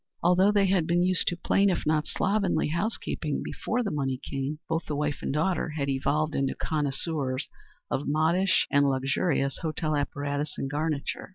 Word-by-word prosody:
Although 180 Hz, +3 st, +5 dB
they 205 Hz, -1 st, +3 dB
had 185 Hz, -4 st, +2 dB
been 175 Hz, +1 st, +3 dB
used 185 Hz, -1 st, +2 dB
to 175 Hz, -, +1 dB
plain, 195 Hz, +3 st, +3 dB
if 180 Hz, -, -1 dB
not 155 Hz, 0 st, +1 dB
slovenly, 195 Hz, -5 st, +1 dB
house 200 Hz, +8 st, -1 dB
keeping 150 Hz, -3 st, -3 dB
before 245 Hz, +2 st, -2 dB
the 205 Hz, -, -2 dB
money 135 Hz, -3 st, -1 dB
came, 140 Hz, +2 st, -2 dB
both 165 Hz, +1 st, -2 dB
the 150 Hz, -, -2 dB
wife 145 Hz, -1 st, -1 dB
and -, -, -2 dB
daughter 165 Hz, +5 st, 0 dB
had 140 Hz, -1 st, -1 dB
evolved 150 Hz, +3 st, 0 dB
into 135 Hz, -1 st, 0 dB
connoisseurs 145 Hz, -2 st, -2 dB, 0.4 s
of 140 Hz, -, -1 dB
modish 165 Hz, +5 st, +3 dB
and 145 Hz, -1 st, +4 dB
luxurious 135 Hz, +2 st, 0 dB
hotel 155 Hz, -1 st, -1 dB
apparatus 145 Hz, +1 st, -2 dB
and 135 Hz, -, -3 dB
garniture. 150 Hz, +2 st, -2 dB
155 Hz, 175 wpm, -27 LUFS, 140-175 Hz, 0.4 s, Although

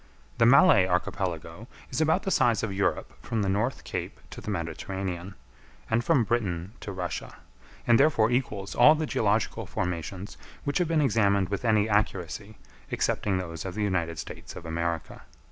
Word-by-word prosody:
The 115 Hz, -, +6 dB
Malay 135 Hz, -, +6 dB
Archipelago 90 Hz, +1 st, -2 dB, 0.2 s
is 130 Hz, -, -1 dB
about 160 Hz, +4 st, +2 dB
the 195 Hz, -, -1 dB
size 115 Hz, -, +3 dB
of 105 Hz, -4 st, -2 dB
Europe 100 Hz, +1 st, -1 dB
from 110 Hz, -3 st, -1 dB
the 95 Hz, -, 0 dB
North 110 Hz, +7 st, -1 dB
Cape -, -, -5 dB
to -, -, -8 dB
the -, -, -6 dB
Mediterranean, 95 Hz, +1 st, -4 dB, 0.6 s
and 115 Hz, +2 st, +2 dB
from 145 Hz, -5 st, +3 dB
Britain 100 Hz, -6 st, -1 dB
to 100 Hz, -, -6 dB
Russia; 90 Hz, -4 st, -5 dB, 0.5 s
and 120 Hz, -1 st, +5 dB
therefore 130 Hz, -6 st, +4 dB
equals 105 Hz, -6 st, -1 dB
all 135 Hz, +6 st, +7 dB
the 155 Hz, 0 st, -1 dB
geological 110 Hz, -6 st, 0 dB
formations 90 Hz, +3 st, -4 dB, 0.3 s
which 145 Hz, +3 st, 0 dB
have 180 Hz, -, +1 dB
been 160 Hz, -1 st, +2 dB
examined 100 Hz, -7 st, +2 dB
with 100 Hz, +2 st, -3 dB
any 110 Hz, -2 st, +3 dB
accuracy, 105 Hz, -1 st, -1 dB, 0.3 s
excepting 100 Hz, -3 st, 0 dB
those 85 Hz, -3 st, -5 dB
of 95 Hz, -1 st, -6 dB
the 105 Hz, -, -1 dB
United 85 Hz, -5 st, -1 dB
States -, -, -8 dB
of 85 Hz, -, -9 dB
America. 85 Hz, 0 st, -3 dB
100 Hz, 165 wpm, -27 LUFS, 90-120 Hz, 0.6 s, all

